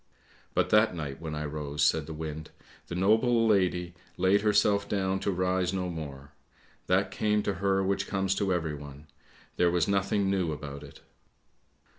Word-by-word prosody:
" - - -30
But - - +1
that 105 -3 +4
night 75 -3 -5
when 80 -2 -4
I 75 0 -3
rose," 75 0 -3
said 75 +1 +2
the 80 - -6
wind, 80 0 -6 0.2
" - - -25
the 85 - -5
noble 110 +5 +3
lady 90 -4 +1 0.2
laid 95 +3 +3
herself 100 -1 +2
down 95 -1 0
to 100 - -2
rise 90 0 0
no 90 -1 -2
more; 70 -4 -8 0.6
that 95 +2 +2
came 105 +1 +1
to 100 - 0
her 95 -1 +2
which 100 +1 -1
comes 95 -1 0
to 95 -1 -1
everyone 75 -4 -4 0.3
— - - -28
there 90 - +4
was 85 -2 +1
nothing 100 0 +1
new 95 -4 0
about 70 -1 -6
it. 70 -1 -13
90 Hz, 180 wpm, -28 LUFS, 75-100 Hz, 0.6 s, that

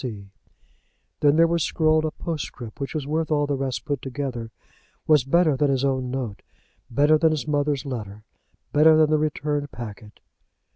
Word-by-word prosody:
C." 100 -6 -7 0.9
Then 145 0 +4
there 165 +1 +6
was 170 0 0
scrawled 155 -1 +2
a - - 0
postscript 145 -9 -6
which 140 +3 -5
was 150 -3 -2
worth 155 +2 -1
all 145 -2 +2
the 145 - -2
rest 135 -2 -3
put 145 -3 -2
together, 130 -4 -5 0.6
was 150 -4 +4
better 155 +2 +3
than 145 +1 +1
his 135 0 +1
own 130 -2 -1
note, 125 -6 -4 0.5
better 145 +5 +3
than 160 0 +4
his 155 -1 -2
mother's 145 -2 0
letter, 105 -6 -6 0.5
better 155 +1 +6
than 155 -1 +4
the 155 - +3
returned 150 -1 -2
packet. 110 -2 -9
145 Hz, 175 wpm, -24 LUFS, 130-155 Hz, 0.9 s, there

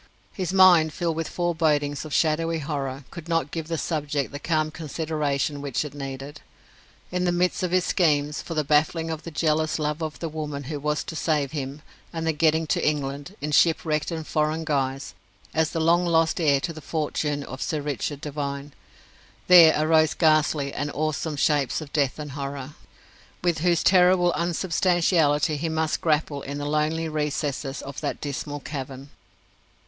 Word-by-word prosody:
His 185 -2 -3
mind, 180 -5 +6
filled 170 -2 -1
with 165 0 -2
forebodings 155 -5 0
of 155 - -8
shadowy 165 +2 +1
horror, 140 -3 -4
could 170 -1 -9
not 165 -4 0
give 160 -2 -4
the 165 0 -2
subject 150 -4 -2
the 145 - -6
calm 155 0 0
consideration 150 -2 -2
which 140 0 -2
it 145 - -7
needed. 135 +1 -7 0.7
In 180 0 0
the 175 - +2
midst 175 +1 +1
of 180 - 0
his 180 0 +2
schemes 150 -4 +1
for 165 - -6
the 155 - +1
baffling 160 +3 +1
of 160 -1 -4
the 170 - -7
jealous 155 0 0
love 150 +1 -2
of 155 -2 -4
the 165 - -4
woman 150 -2 -5
who 145 +2 -5
was 150 +1 -1
to 160 - -7
save 150 -3 0
him, 145 0 -5 0.3
and 165 -1 -4
the 160 - +2
getting 160 +1 +2
to - - 0
England, 145 +3 -2
in 150 +1 -3
shipwrecked 155 -1 +2
and 160 -2 -4
foreign 155 +1 0
guise, 135 -3 -2 0.4
as 160 0 +2
the 165 - -3
long 170 +2 +3
lost 165 +1 +2
heir 145 -3 +4
to 165 - -3
the 155 - -10
fortune 150 -2 -2
of 130 -1 -8
Sir 155 - -1
Richard 145 0 -3
Devine, 140 -1 -4 0.7
there 170 -3 +8
arose 155 0 +3
ghastly 155 -3 +2
and 145 - -2
awesome 155 0 -2
shapes 140 -2 +1
of 155 -3 -10
death 140 -4 +1
and 150 -2 -6
horror, 140 0 -5 0.7
with 175 -3 +1
whose 170 0 +2
terrible 180 -1 +5
unsubstantiality 170 -3 +2
he 165 +3 -2
must 160 -1 -1
grapple 150 -4 0
in 140 +1 -5
the 145 - -4
lonely 155 +2 0
recesses 150 -2 -2
of 140 -1 -7
that - - -3
dismal 145 0 -4
cavern. 135 -1 -7
155 Hz, 175 wpm, -25 LUFS, 145-165 Hz, 0.7 s, there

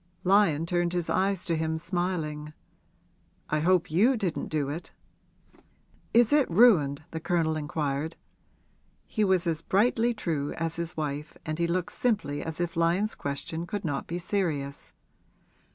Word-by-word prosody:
Lyon 180 -5 +4
turned 175 0 0
his 175 -2 -1
eyes 195 -1 +1
to 170 - 0
him, 160 0 -1
smiling. 160 -4 -3 1.0
'I 150 - +2
hope 175 0 +2
you 230 +10 +4
didn't 190 -7 -2
do 150 -3 -1
it?' 155 +5 -6 1.2
'Is 240 +3 +5
it 295 -3 +4
ruined?' 165 - +5
the 160 - -4
Colonel 160 -1 0
inquired. 150 0 -2 0.9
He 215 - -1
was 190 -3 +3
as 165 -2 -1
brightly 230 +5 +2
true 155 -8 -2
as 165 0 -3
his 170 0 -3
wife 150 0 -4
and 155 0 -3
he 170 - +2
looked 175 0 -1
simply 200 -12 0
as 160 0 -5
if 175 -1 -2
Lyon's 170 +6 +2
question 160 +4 -4
could 205 +1 -4
not 145 -3 -2
be 170 - -3
serious. 165 -7 -2
170 Hz, 150 wpm, -28 LUFS, 155-190 Hz, 1.2 s, Is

